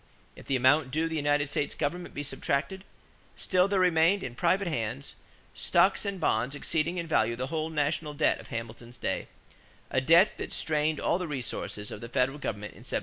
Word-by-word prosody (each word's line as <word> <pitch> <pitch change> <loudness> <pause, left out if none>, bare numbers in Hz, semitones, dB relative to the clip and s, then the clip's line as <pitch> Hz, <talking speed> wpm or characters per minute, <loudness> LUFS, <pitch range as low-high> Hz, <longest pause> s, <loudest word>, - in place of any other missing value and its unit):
If - - -14
the 135 - +1
amount 130 +3 +4
due 160 +5 0
the 165 - -4
United 145 -1 +1
States 145 0 -2
government 175 +5 -3
be 145 - -3
subtracted, 155 +7 -2 0.5
still 185 0 +2
there 200 -1 +1
remained, 180 +2 +4
in 125 - -5
private 180 +8 +1
hands, 130 -2 -3 0.4
stocks - - +2
and 200 -2 -3
bonds 125 -2 +1
exceeding 165 +4 -1
in 170 - -2
value 115 -7 +2
the 130 +5 -4
whole 160 0 -1
national 150 0 -1
debt 155 - +2
of - - -11
Hamilton's 115 0 -7
day - - -2 0.6
a 130 - +2
debt 165 +8 +5
that - - -5
strained 155 -1 0
all 175 - +1
the 180 - -3
resources 120 -6 -4
of - - -7
the 115 - -7
Federal 135 +3 0
government 105 -5 -4
in - - -15
1790. - - -2
145 Hz, 195 wpm, -29 LUFS, 130-165 Hz, 0.6 s, debt